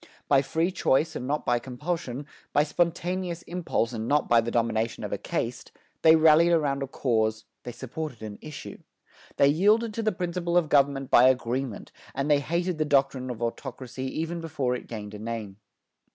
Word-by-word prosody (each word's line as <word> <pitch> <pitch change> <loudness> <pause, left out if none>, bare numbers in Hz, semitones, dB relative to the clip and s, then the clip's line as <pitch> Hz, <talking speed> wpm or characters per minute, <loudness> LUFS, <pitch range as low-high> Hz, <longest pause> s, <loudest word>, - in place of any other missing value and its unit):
By 140 -2 +5
free 160 +6 0
choice 160 -4 +1
and 125 - -4
not 150 +2 -1
by 120 0 +2
compulsion, 135 +2 -4 0.3
by 145 - +4
spontaneous 175 +2 -1
impulse, 170 -9 -2
and 110 0 -4
not 145 +2 +2
by 120 -1 +5
the 115 - -3
domination 115 -1 -1
of - - -4
a - - -1
caste, - - -4 0.3
they 160 0 +7
rallied 160 +2 +6
around 145 -4 +1
a 135 - -2
cause, 110 -4 0 0.2
they 120 - -7
supported 130 +1 -6
an 105 -1 -7
issue. 155 -1 -8 0.6
They 140 - +5
yielded 210 +8 +3
to 230 - -2
the 215 -1 +1
principle 175 -2 -1
of 165 -4 +2
government 140 -2 +2
by 125 +2 +7
agreement, 125 -2 -2 0.2
and 135 +3 0
they 145 - +5
hated 170 +3 -2
the - - +3
doctrine 135 -3 +1
of 120 -1 -5
autocracy 130 +1 -5
even 165 +1 -3
before 145 -6 -1
it 125 - -5
gained 105 -2 -7
a 105 - -8
name. 110 -3 -5
140 Hz, 180 wpm, -27 LUFS, 120-165 Hz, 0.6 s, they